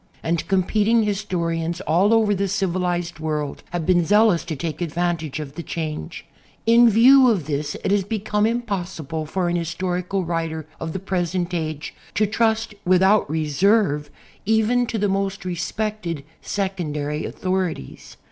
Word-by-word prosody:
And 165 0 -1
competing 210 +4 +2
historians 170 -5 -2
all 190 +3 +2
over 220 -2 +4
the 200 0 0
civilized 175 -3 -1
world 150 -2 -3
have 175 -2 -3
been 175 -1 +4
zealous 205 -1 +4
to 165 -3 -4
take 160 +3 -4
advantage 170 -2 -2
of 145 -2 -6
the 170 - -6
change. 155 - -5 0.4
In 235 +1 +6
view 255 +4 +7
of 195 -10 +1
this 150 0 -2
it - - 0
has 200 -1 +3
become 210 +1 0
impossible 180 - -3
for 180 +2 -1
an 175 - 0
historical 180 +2 -2
writer 165 -2 -2
of 165 -1 -4
the - - -2
present 180 -1 -2
age 155 -3 -3 0.2
to 215 - +3
trust 220 +1 0
without 190 +1 +4
reserve 155 0 +2 0.3
even 220 +3 +2
to 225 - -2
the 205 0 +1
most 195 -1 -2
respected 180 -2 -3 0.2
secondary 155 -7 -2
authorities. 185 - -3
180 Hz, 145 wpm, -22 LUFS, 165-205 Hz, 0.4 s, view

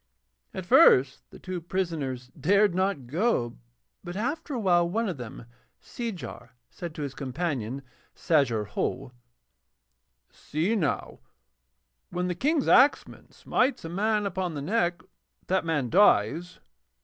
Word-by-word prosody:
At 185 - -6
first 130 -6 +5
the - - -13
two 185 -1 -6
prisoners 160 -9 -3
dared 200 +7 +2
not 185 -7 -1
go, 150 - 0 0.5
but 175 - -7
after 285 +7 -3
a - - -2
while 175 -4 +3
one 225 +5 -1
of 180 -6 -3
them, 120 -2 -9 0.3
Seejar, 150 - -7 0.2
said 170 -3 -7
to 150 - -4
his 140 -2 -4
companion, 135 -3 -3 0.3
Sajar 130 - +1
Ho: 130 +5 -3 1.2
'See 170 +9 -2
now, 165 -9 -2 0.9
when 180 +1 -2
the 180 - -1
King's 285 - 0
axeman 275 +3 +3
smites 255 -7 0
a - - -5
man 210 +4 0
upon 185 -3 -2
the 145 - -4
neck 175 -1 0 0.4
that 190 -1 0
man 145 -7 -1
dies.' 175 - +3
175 Hz, 130 wpm, -27 LUFS, 140-200 Hz, 1.2 s, first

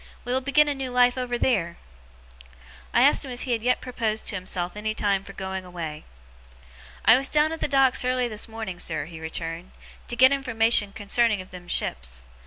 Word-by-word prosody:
We 245 - -2
will 260 - +1
begin 290 +3 +4
a 290 - +1
new 270 -2 -5
life 245 0 +4
over 250 -1 -2
theer!' 170 -10 0 1.1
I 240 - +4
asked 285 - +4
him 270 - -7
if 245 -1 -6
he 245 -2 0
yet 245 +3 0
proposed 225 -4 -2
to - - -1
himself 180 -1 -4
any 215 +1 -3
time 200 -2 0
for 195 - -11
going 190 -1 -5
away. 165 -4 -7 1.0
'I 225 - +8
was 270 +1 +1
down 305 +1 +3
at 325 - -5
the - - -1
Docks 270 -3 +3
early 250 0 +1
this 215 -3 -3
morning, 220 -5 -6
sir,' - - -1
he 165 -1 -10
returned, 165 +2 -6 0.3
'to 240 - -4
get 260 +2 +6
information 230 -6 +2
concerning 215 +1 +1
of 185 - -10
them 180 -1 -11
ships. 60 - -2
225 Hz, 195 wpm, -25 LUFS, 185-255 Hz, 1.1 s, I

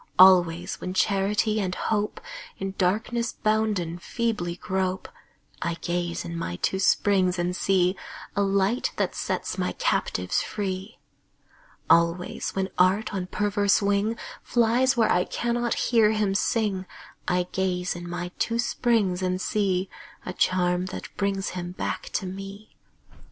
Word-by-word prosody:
Always 175 -2 +5
when 185 +1 -4
Charity 205 +3 +2
and 185 -2 -2
Hope, 210 -1 -1 0.4
In 195 0 -4
darkness 225 +5 0
bounden, 210 -6 0
feebly 210 -3 -2
grope, 185 0 -2 0.5
I 170 -1 -1
gaze 175 0 -3
in 170 0 -5
my 125 - -3
two 190 - -1
springs 185 -1 +3
and 175 +1 -1
see 185 -1 +2 0.4
A 200 - +2
Light 200 +4 +1
that - - 0
sets - - -3
my - - -1
captives - - 0
free. 195 +1 -4 0.9
Always, 170 +2 +2
when 190 0 -1
Art 190 +4 +3
on 185 -2 -3
perverse 205 +1 +2
wing 205 +2 +1 0.2
Flies 240 +2 +2
where 225 -2 +4
I 180 - +3
cannot 240 +2 -1
hear 220 -3 +3
him 210 -2 +1
sing, 195 -2 0 0.4
I 180 0 +2
gaze 180 -1 -1
in 175 0 -7
my 175 0 -4
two 230 - 0
springs 225 -6 +1
and 185 0 0
see 190 -2 0 0.4
A 180 - -4
charm 180 0 +1
that 185 - -8
brings 195 -1 -1
him 175 -1 -5
back - - -4
to 190 - -1
me. 195 +3 -8
190 Hz, 140 wpm, -26 LUFS, 180-210 Hz, 0.9 s, Always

